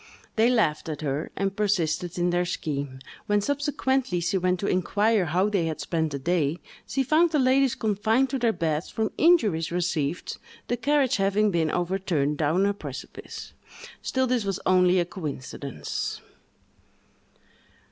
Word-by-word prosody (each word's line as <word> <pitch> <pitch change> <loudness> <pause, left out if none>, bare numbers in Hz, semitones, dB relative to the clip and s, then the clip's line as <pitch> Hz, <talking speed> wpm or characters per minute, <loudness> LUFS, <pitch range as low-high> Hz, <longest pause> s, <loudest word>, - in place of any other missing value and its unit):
They 225 +2 +4
laughed 185 -11 +1
at 150 -1 -5
her, 145 +1 -2
and 195 0 -1
persisted 180 -4 0
in 175 0 +1
their 175 0 +2
scheme. 140 -6 -4 0.3
When, 205 0 +3
subsequently, 270 -3 0
she 170 +3 -1
went 180 -1 +1
to - - -1
inquire 205 +2 +2
how 180 +5 +1
they 195 -6 0
had 160 - -3
spent 160 -2 -1
the 140 - -2
day, 160 +1 0 0.3
she 270 - 0
found 310 +6 +4
the 310 - +1
ladies 265 -1 +3
confined 220 +5 +1
to 270 - -1
their 235 -2 +3
beds 160 -4 -2
from 220 -1 -1
injuries 215 - +3
received, 170 -2 -1 0.3
the 240 - +2
carriage 275 +2 +2
having 200 +2 +2
been 165 -3 +1
overturned 175 -5 -1
down 160 +6 +2
a 200 - +2
precipice. 200 - -8 0.5
Still, 260 0 0
this 250 -3 +1
was 195 -2 -2
only 180 0 +4
a 175 - +1
coincidence! 145 - -5
185 Hz, 155 wpm, -26 LUFS, 165-225 Hz, 0.5 s, They